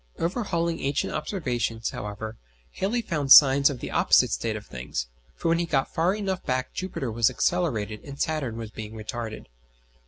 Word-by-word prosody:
Overhauling 170 Hz, -3 st, -1 dB
ancient 140 Hz, +1 st, -1 dB
observations, 120 Hz, -, -2 dB
however, 105 Hz, +2 st, -6 dB, 0.4 s
Halley 230 Hz, -, -1 dB
found 150 Hz, -8 st, -2 dB
signs 140 Hz, -1 st, +9 dB
of 130 Hz, -5 st, -6 dB
the -, -, -5 dB
opposite -, -, +4 dB
state -, -, -1 dB
of -, -, -7 dB
things, 60 Hz, -1 st, -4 dB, 0.3 s
for -, -, -3 dB
when 165 Hz, 0 st, +3 dB
he 170 Hz, -, -1 dB
got 135 Hz, -4 st, 0 dB
far 175 Hz, +4 st, +2 dB
enough 195 Hz, -3 st, -3 dB
back 130 Hz, 0 st, -2 dB
Jupiter 170 Hz, -10 st, -4 dB
was 115 Hz, +1 st, +3 dB
accelerated 115 Hz, -12 st, -1 dB
and 140 Hz, -1 st, -9 dB
Saturn 145 Hz, -8 st, -1 dB
was 110 Hz, -2 st, -6 dB
being 110 Hz, 0 st, -8 dB
retarded. 110 Hz, +1 st, -6 dB
135 Hz, 165 wpm, -26 LUFS, 110-170 Hz, 0.4 s, signs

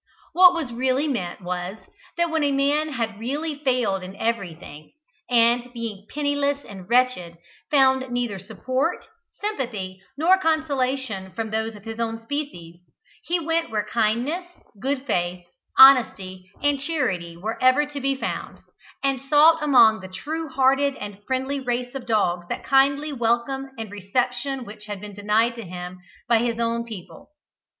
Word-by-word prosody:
What 360 Hz, 0 st, +7 dB
was 290 Hz, -8 st, -3 dB
really 260 Hz, +4 st, +1 dB
meant 205 Hz, -9 st, -3 dB
was, 180 Hz, +2 st, -4 dB, 0.4 s
that, 340 Hz, -1 st, +1 dB
when 320 Hz, -2 st, +1 dB
a 285 Hz, -, +2 dB
man 290 Hz, +2 st, +1 dB
had 225 Hz, -4 st, -3 dB
really 290 Hz, +7 st, -2 dB
failed 245 Hz, -8 st, +1 dB
in 185 Hz, +1 st, -8 dB
everything, 175 Hz, -9 st, -4 dB, 0.4 s
and, 240 Hz, 0 st, +3 dB
being 220 Hz, -4 st, -6 dB
penniless 285 Hz, -1 st, -1 dB
and 190 Hz, -2 st, -10 dB
wretched, 240 Hz, -9 st, +2 dB, 0.3 s
found 265 Hz, -2 st, +3 dB
neither 240 Hz, -5 st, -2 dB
support, 255 Hz, -, -2 dB, 0.4 s
sympathy, 225 Hz, -, -4 dB, 0.2 s
nor 360 Hz, +5 st, +4 dB
consolation 265 Hz, -, -1 dB
from 225 Hz, -1 st, -4 dB
those 220 Hz, 0 st, -2 dB
of 205 Hz, -, -13 dB
his 225 Hz, 0 st, -6 dB
own 225 Hz, 0 st, -3 dB
species, 225 Hz, -, -5 dB, 0.5 s
he 350 Hz, +1 st, 0 dB
went 330 Hz, 0 st, -1 dB
where 210 Hz, -1 st, -1 dB
kindness, 235 Hz, +11 st, 0 dB, 0.3 s
good 270 Hz, +3 st, -2 dB
faith, 175 Hz, -6 st, -1 dB, 0.3 s
honesty, 195 Hz, -9 st, +6 dB
and 290 Hz, -1 st, +2 dB
charity 185 Hz, -, -2 dB
were 215 Hz, +6 st, -5 dB
ever 255 Hz, +3 st, +5 dB
to 290 Hz, -1 st, -7 dB
be 275 Hz, +1 st, +1 dB
found, 265 Hz, -, -4 dB, 0.5 s
and 270 Hz, -2 st, 0 dB
sought 300 Hz, +4 st, +5 dB
among 240 Hz, -7 st, +6 dB
the 190 Hz, -, -9 dB
true 310 Hz, +12 st, -5 dB
hearted 275 Hz, +1 st, +2 dB
and 205 Hz, -2 st, -8 dB
friendly 265 Hz, +2 st, -1 dB
race 245 Hz, -1 st, -2 dB
of 260 Hz, -3 st, -7 dB
dogs 180 Hz, -6 st, +1 dB
that -, -, -4 dB
kindly 280 Hz, +2 st, +3 dB
welcome 240 Hz, +2 st, 0 dB
and 220 Hz, -3 st, -6 dB
reception 250 Hz, +6 st, -2 dB
which 210 Hz, 0 st, -11 dB
had 205 Hz, -2 st, -5 dB
been 205 Hz, +1 st, -9 dB
denied 210 Hz, +4 st, +2 dB
to 230 Hz, -, -8 dB
him 180 Hz, 0 st, -7 dB, 0.3 s
by 235 Hz, -1 st, +4 dB
his 235 Hz, 0 st, -1 dB
own 235 Hz, 0 st, 0 dB
people. 215 Hz, 0 st, -10 dB
245 Hz, 155 wpm, -24 LUFS, 205-280 Hz, 0.5 s, What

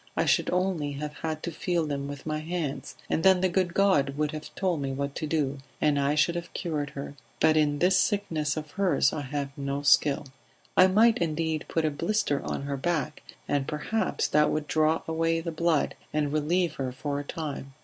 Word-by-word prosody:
I -, -, +2 dB
should -, -, +2 dB
only 180 Hz, -6 st, 0 dB
have 150 Hz, +1 st, -5 dB
had 155 Hz, -1 st, -4 dB
to 170 Hz, -, -3 dB
feel 170 Hz, 0 st, -1 dB
them 140 Hz, -2 st, -3 dB
with 145 Hz, -1 st, -8 dB
my 155 Hz, -1 st, -2 dB
hands, 160 Hz, -3 st, -4 dB
and -, -, 0 dB
then 190 Hz, 0 st, +5 dB
the 185 Hz, -, +4 dB
good 180 Hz, -1 st, 0 dB
God 145 Hz, -9 st, +3 dB
would 150 Hz, 0 st, 0 dB
have 155 Hz, 0 st, -7 dB
told 180 Hz, -6 st, 0 dB
me 135 Hz, -1 st, -2 dB
what 140 Hz, +1 st, -3 dB
to 155 Hz, -, -3 dB
do 145 Hz, -3 st, -1 dB, 0.2 s
and 150 Hz, -2 st, +2 dB
I 140 Hz, +1 st, +1 dB
should 155 Hz, +3 st, +3 dB
have 170 Hz, 0 st, -5 dB
cured 150 Hz, -4 st, -2 dB
her. 140 Hz, 0 st, -6 dB, 0.3 s
But 160 Hz, 0 st, +4 dB
in 150 Hz, -2 st, +2 dB
this 180 Hz, +4 st, +4 dB
sickness 165 Hz, -8 st, 0 dB
of 150 Hz, -1 st, -5 dB
hers 185 Hz, -8 st, +2 dB
I 155 Hz, -, -3 dB
have 140 Hz, 0 st, -4 dB
no 140 Hz, 0 st, -3 dB
skill. 145 Hz, 0 st, +4 dB, 0.5 s
I 185 Hz, -, +7 dB
might 220 Hz, +4 st, +4 dB
indeed 160 Hz, -1 st, -1 dB
put 165 Hz, -1 st, 0 dB
a 155 Hz, -, +1 dB
blister 200 Hz, -1 st, 0 dB
on -, -, -4 dB
her 140 Hz, 0 st, -3 dB
back, 160 Hz, -1 st, -2 dB, 0.3 s
and 140 Hz, -2 st, 0 dB
perhaps 180 Hz, +9 st, -1 dB
that 150 Hz, 0 st, +4 dB
would 155 Hz, -1 st, -1 dB
draw 155 Hz, 0 st, +2 dB
away 165 Hz, 0 st, +1 dB
the 165 Hz, 0 st, -4 dB
blood 165 Hz, -1 st, +1 dB, 0.2 s
and 150 Hz, -1 st, 0 dB
relieve 160 Hz, +2 st, +1 dB
her 130 Hz, -2 st, -2 dB
for 140 Hz, +2 st, -3 dB
a -, -, -4 dB
time. 140 Hz, -3 st, -6 dB
155 Hz, 210 wpm, -27 LUFS, 145-170 Hz, 0.5 s, I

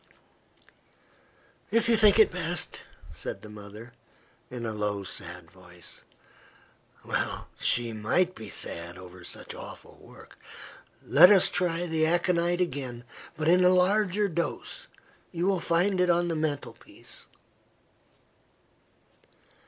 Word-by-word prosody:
"If 230 Hz, 0 st, +2 dB
you 230 Hz, -, +5 dB
think 215 Hz, -2 st, +6 dB
it 220 Hz, -, +6 dB
best," 175 Hz, -1 st, -3 dB, 0.3 s
said -, -, -7 dB
the 105 Hz, -, -10 dB
mother, 105 Hz, +3 st, -11 dB, 0.6 s
in 120 Hz, -2 st, -6 dB
a 110 Hz, -, -2 dB
low 105 Hz, -1 st, -2 dB
sad 90 Hz, -3 st, -8 dB
voice 90 Hz, -1 st, -13 dB, 1.0 s
(well -, -, -2 dB
she 120 Hz, -1 st, +1 dB
might 170 Hz, +13 st, +1 dB
be 110 Hz, -, -9 dB
sad 85 Hz, +1 st, -5 dB
over 90 Hz, 0 st, -12 dB
such -, -, -6 dB
awful -, -, -11 dB
work) -, -, -16 dB, 0.7 s
"let 175 Hz, +5 st, +8 dB
us 195 Hz, -3 st, +6 dB
try 175 Hz, -1 st, -1 dB
the 160 Hz, -2 st, +1 dB
aconite 175 Hz, +1 st, +1 dB
again, 130 Hz, -7 st, -3 dB, 0.3 s
but 155 Hz, 0 st, -1 dB
in 180 Hz, +2 st, +5 dB
a 180 Hz, -, +7 dB
larger 200 Hz, +2 st, +3 dB
dose. 170 Hz, -2 st, -4 dB, 0.4 s
You 175 Hz, 0 st, -2 dB
will 190 Hz, -1 st, +2 dB
find 180 Hz, +3 st, +1 dB
it 180 Hz, -, +2 dB
on 175 Hz, 0 st, +2 dB
the 165 Hz, -, -1 dB
mantelpiece." 155 Hz, -2 st, -5 dB
165 Hz, 120 wpm, -28 LUFS, 105-180 Hz, 1.0 s, let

